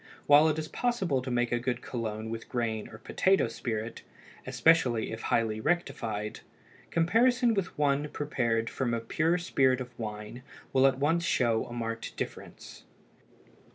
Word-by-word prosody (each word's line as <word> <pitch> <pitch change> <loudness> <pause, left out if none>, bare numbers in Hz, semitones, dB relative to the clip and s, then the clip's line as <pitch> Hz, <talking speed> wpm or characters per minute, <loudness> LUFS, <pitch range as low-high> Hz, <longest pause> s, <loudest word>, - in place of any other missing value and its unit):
While 145 +2 +7
it 155 - -1
is 155 -1 -3
possible 190 - 0
to 130 - -5
make 120 -1 0
a 120 - +1
good 120 0 -2
cologne 110 -2 -4
with 115 0 -6
grain 115 -3 -2
or 110 - -11
potato 190 - +2
spirit, 115 -1 -4 0.5
especially 130 -9 +3
if 110 0 -6
highly 110 -2 0
rectified, 110 -10 -2 0.5
comparison 235 +8 +3
with 195 -5 -2
one 145 0 +1
prepared 115 -7 -1
from 120 -2 -1
pure 165 +8 +1
spirit 135 -7 +2
of 125 -1 -6
wine 105 +2 -6 0.3
will 135 0 +6
at 130 -1 +1
once 160 +5 +1
show 115 -7 +1
a 120 - -8
marked 115 -1 -4
difference. - - -7
125 Hz, 150 wpm, -29 LUFS, 115-155 Hz, 0.5 s, While